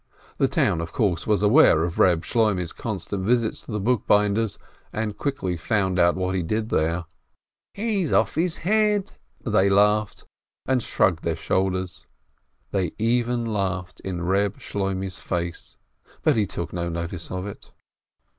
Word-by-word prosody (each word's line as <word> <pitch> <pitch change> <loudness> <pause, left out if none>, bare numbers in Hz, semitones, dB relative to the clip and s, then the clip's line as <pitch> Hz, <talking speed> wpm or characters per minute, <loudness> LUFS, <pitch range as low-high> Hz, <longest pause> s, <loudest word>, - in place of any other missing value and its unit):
The - - +4
town, 85 - +1
of 85 -1 -5
course, 90 -7 0
was 105 -1 +2
aware 105 - +6
of 85 0 -3
Keb 85 -3 +4
Shloimeh's 105 -7 0
constant 100 -3 -4
visits 115 +1 +1
to - - -7
the 105 - -1
bookbinder's, 105 -1 +2 0.3
and 110 -1 -3
quickly 105 -9 -2
found 95 0 0
out 85 0 +4
what 95 0 -1
he 95 - 0
did 110 +6 -2
{here. 85 +2 0 0.7
"He's 200 -6 0
just - - +2
off - - +1
his 165 +1 0
head 210 0 +2
!" - - -34
they 105 -4 +3
laughed, 105 +1 +2 0.4
and 130 -2 +1
shrugged 90 -6 +1
their 85 -1 0
shoulders. 95 +1 -2 0.6
They 95 -4 -1
even 120 +1 +1
laughed 95 -4 -2
in 95 -2 -4
Eeb 95 +3 +1
Shloimeh's 95 -2 -3
face, 85 -1 -4 0.5
but 155 - +4
he 105 -3 +1
took 85 - -5
no 85 -1 -2
notice 85 +1 -5
of 95 0 -4
it. 100 - -9
100 Hz, 155 wpm, -24 LUFS, 90-115 Hz, 0.7 s, aware